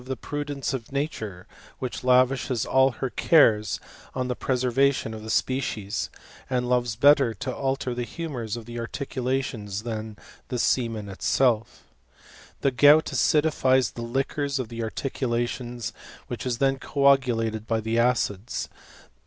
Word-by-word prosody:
^ 130 0 -5
prudence 145 -1 -3
of 125 -2 -5
nature, 110 - -4 0.3
which 125 -1 -5
lavishes 125 -1 +3
all 130 0 +4
tier 130 +2 -4
carea| 110 - +4 0.5
the 125 - -2
preservation 130 -1 +1
of 110 - -7
the 110 - -8
species, 110 -4 -1 0.4
and 125 -1 0
loves 120 -2 +1
bettail 130 -2 +3
alter 135 -2 -2
the 120 - -3
humours 120 -7 -5
of 115 - -8
the 120 +1 -6
articulations 125 -5 -3
than 110 -2 -5 0.3
the 125 - -4 0.2
am 115 -4 -4
itself. 115 +4 0 0.8
The 140 - +2
gout 145 +4 +6
acidifies 130 -7 +2
the 120 - -7
liquors 135 +3 -1
of 130 -4 -3
the 115 0 -5
arti 115 +4 -3
latioDs, 120 -1 -2 0.3
which 120 +1 -5
is 120 -2 -1
then 135 0 +1
copulated 120 -7 +2
by 115 -1 +1
the 110 +1 0
acids. 120 -3 0
125 Hz, 135 wpm, -25 LUFS, 115-135 Hz, 0.8 s, gout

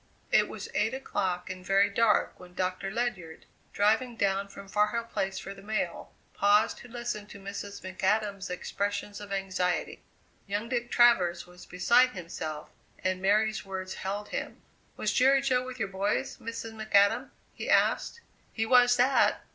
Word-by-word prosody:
It - - +4
was - - -7
eight 220 +4 +1
o'clock 190 -9 -2
and 185 0 -8
very 195 +2 +4
dark 230 -1 +2
when 180 0 -14
Doctor 185 +1 -2
Ledyard, 205 -8 -3 0.3
driving 225 +4 +2
down 200 -1 0
from 200 0 -11
Far 210 +1 +2
Hill 230 +2 -2
Place 195 -4 -3
for 195 +1 -6
the 195 - -13
mail, 215 +2 -3 0.2
paused 205 +2 +3
to - - -12
listen 240 -3 -5
to 200 - -11
Mrs. 200 +1 -7
McAdam's 195 +1 -1
expressions 205 +3 -3
of 205 -1 -9
anxiety. 190 -2 -1 0.5
Young 205 +3 -3
Dick 240 -1 -1
Travers 190 -8 +4
was 180 0 -15
beside 240 +8 +4
him, 180 -3 -8 0.7
and 185 0 0
Mary's 215 +3 +2
words 190 -1 -5
held 205 +2 -4
him. - - -5 0.3
"Was - - 0
Jerry 270 +2 +5
Jo 255 -2 +2
with 255 0 -7
your 220 -5 -1
boys, 195 +2 -1
Mrs. 230 0 -6
McAdam?" 215 -2 +2 0.2
he - - -6
asked. 470 - +2 0.3
"He 225 - -1
was 245 +1 +5
that! 260 +2 +3
205 Hz, 160 wpm, -29 LUFS, 190-230 Hz, 0.7 s, Jerry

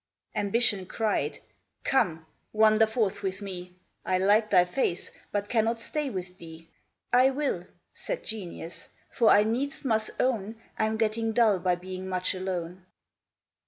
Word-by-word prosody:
Ambition 205 -2 +2
cried, 220 +1 -1 0.5
'Come, 165 -11 +1 0.3
wander 220 0 +5
forth 215 -3 -1
with 190 -2 -3
me; 180 -3 -7 0.3
I 185 - +1
like 205 +3 +3
thy 180 -3 +5
face 180 -2 -1 0.2
but 205 0 -1
cannot 230 0 +1
stay 295 +4 -3
with 185 -4 -6
thee.' 165 0 -11 0.5
'I 255 +2 +6
will,' 270 -11 -2 0.3
said - - -4
Genius, 180 -5 -7 0.2
'for 230 -2 +3
I 205 - +7
needs 255 +7 -2
must 220 -3 +1
own 225 -3 0 0.2
I'm 220 0 +1
getting 225 0 0
dull 220 -5 +4
by 180 0 +1
being 185 +1 -7
much 185 0 0
alone.' 185 -1 -4
205 Hz, 140 wpm, -28 LUFS, 185-225 Hz, 0.5 s, I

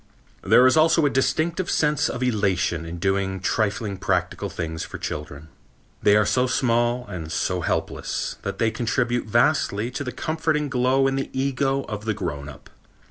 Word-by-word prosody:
There 125 - +5
is 130 - +5
also 160 0 +4
a 145 - +2
distinct 165 +6 0
sense 150 -2 +2
of 125 - -3
elation 95 -8 0
in 85 +1 -6
doing 95 +1 0
trifling 100 +1 -1
practical 95 +1 -1
things 80 -2 -4
for - - -7
children. 75 0 -6 0.5
They 105 - +5
are 105 0 +4
so 125 +4 +2
small 120 -1 +1
and 80 -7 -7
so - - -1
helpless - - -2
that - - -4
they 115 -1 +1
contribute 120 +1 -1
vastly 120 -2 +2
to 130 +1 -4
a - - -5
comforting 155 +1 -1
glow 130 +1 +2
in 135 0 +1
the 135 - -3
ego 135 0 0
of 105 -1 -6
the 110 -2 0
grown 75 -8 -4
up. - - -14
120 Hz, 170 wpm, -24 LUFS, 95-135 Hz, 0.5 s, There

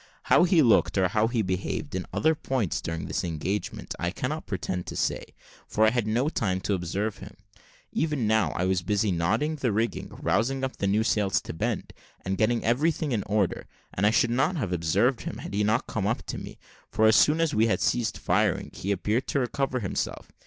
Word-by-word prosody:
How - - +7
he 175 -3 +4
looked, 110 -4 +3
or 95 -1 +3
how 110 +3 +2
he 115 -2 0
behaved 95 -1 -3
in 95 -1 -3
other 160 +1 +2
points 130 - -2
during 80 0 -4
the - - -2
engagement, 85 +5 -3
I - - 0
cannot - - -4
pretend 90 -1 -3
to - - -6
say, - - -1 0.4
for 110 - +2
I 110 - +4
had 120 -3 0
no 120 +6 +1
time 95 - 0
to 100 - -1
observe 100 +4 -2
him. 100 - -11 0.6
Even 150 -7 0
now, 110 -6 +3
I 90 - 0
was 95 -1 +1
busy 105 +3 +1
knotting 110 - 0
the 130 -5 0
rigging, 110 +3 -1
rousing 135 +3 0
up 130 - -4
new 100 +2 +2
sails 100 -5 +1
to - - -7
bend, 80 - -3 0.3
and 95 +1 -1
getting 110 +4 +1
everything 150 +5 +1
in 110 -4 +1
order, 105 -2 0 0.3
and 100 +3 +2
I - - +6
should 115 +1 +2
not 135 +9 +1
have 105 - -2
observed 80 -2 +1
him, - - -5
had - - -8
he 105 +1 +1
not 110 +2 +1
come - - -2
up - - -1
to - - -5
me; - - -9 0.3
for 110 - +2
as 110 0 +6
soon 155 +2 +5
as 165 -2 +1
we 110 +2 +3
had 110 - +1
ceased 120 -3 0
firing - - 0
he 100 - -3
appeared 105 +6 0
to 140 - 0
recover 130 0 -1
himself. 95 - -3
110 Hz, 210 wpm, -27 LUFS, 95-125 Hz, 0.6 s, How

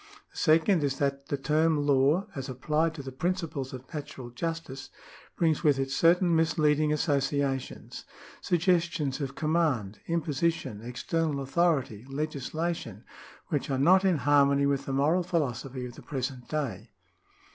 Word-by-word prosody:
The - - -16
second 165 +1 +3
is 140 -1 0
that 140 0 -1
the 145 - -1
term 155 +1 +1
law, 145 +6 +3
as 135 0 -5
applied 155 +5 0
to 140 - -7
the 130 - -7
principles 160 -3 -3
of 130 0 -10
natural 145 -5 -7
justice, 150 0 -5 0.5
brings 160 -2 +1
with 145 -4 +4
it 135 0 -2
certain 170 +3 +4
misleading 155 -2 +2
associations 140 -3 -1 0.2
— - - -19
suggestions 170 -5 +1
of 135 -1 -4
command, 155 - 0
imposition, 165 -8 -1
external 140 +5 -2
authority, 135 -6 0
legislation 155 +4 -3 0.2
— - - -21
which - - -1
are 135 - 0
not 180 +8 +5
in 185 -4 +3
harmony 140 0 +3
with 140 -1 0
the - - -2
moral 145 +7 +2
philosophy 135 -7 -2
of 120 - -8
the - - -12
present 130 -2 -5
day. 120 -9 -3
145 Hz, 145 wpm, -28 LUFS, 135-165 Hz, 0.5 s, not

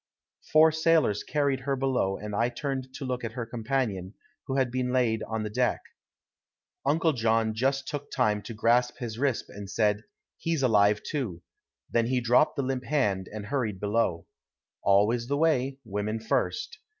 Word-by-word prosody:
Four 160 +1 +7
sailors 160 -9 +2
carried 140 -3 0
her 135 +1 -1
below 130 -8 0
and 105 0 -6
I 115 +3 +2
turned 130 +1 -4
to 135 - -5
look 125 -1 -3
at 115 -1 -4
her 120 -1 -4
companion, 115 -5 -2 0.3
who 135 - -2
had 130 -3 +1
been 125 0 -1
laid 120 -4 +2
on 110 -1 -2
the 105 - -3
deck. 125 +3 +1 1.0
Uncle 160 +3 +2
John 115 -2 +1
just 135 +4 0
took 145 -1 -5
time 105 -1 +1
to 115 - -8
grasp 120 +3 +2
his 115 -2 -5
wrist 135 -3 0
and 100 -1 -9
said, 105 0 +1 0.3
"He's 165 -4 -1
alive, 105 -3 +4
too"; 110 - -4 0.4
then 115 -1 +1
he 130 0 +1
dropped 125 +6 +3
the 140 - -1
limp 130 -1 -2
hand 105 -9 0
and 105 -1 -6
hurried 115 -6 -2
below. 105 -5 0 0.6
Always 105 +5 +3
the 140 +2 0
way. 135 -4 +2
Women 105 +1 -2
first. 110 - -1
120 Hz, 170 wpm, -28 LUFS, 105-135 Hz, 1.0 s, Four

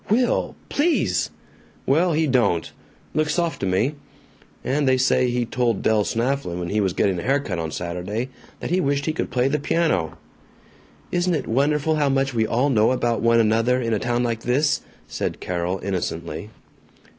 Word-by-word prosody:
"Will! 240 +4 +1
PLEASE!" 320 +3 +1 0.6
"Well, 165 +5 +3
he 160 +1 +2
don't. 120 - +1 0.4
Looks 155 -1 +1
soft 170 -2 -1
to 95 - -1
me. 100 +10 +1 0.7
And 140 +1 0
they 130 - +4
say 125 0 +3
he 120 0 0
told 120 0 0
Del 110 -1 +3
Snafflin, 115 -5 -1
when 90 -1 -4
he 105 +1 +1
was 95 -3 0
getting 95 -1 +1
a - - -3
hair 135 +7 +2
cut 95 -11 -4
on 80 -1 -2
Saturday, 90 +9 -4 0.3
that - - -4
he 185 +1 +2
wished 140 0 0
he 155 - 0
could - - -3
play 125 +1 +1
the 150 +2 0
piano." 145 - 0 0.9
"Isn't 175 0 +1
it - - -2
wonderful 150 +5 +1
how 145 -2 +2
much 135 -1 +1
we 110 -2 +1
all 130 +6 +1
know 110 -3 +4
about 120 -3 0
one 115 0 +4
another 115 +3 +3
in 115 -2 -1
a 105 - +1
town 120 +1 0
like 115 -2 -1
this," 140 +5 +1 0.3
said - - -3
Carol 90 +1 -2
innocently. 85 -1 -3
125 Hz, 180 wpm, -23 LUFS, 105-145 Hz, 0.9 s, they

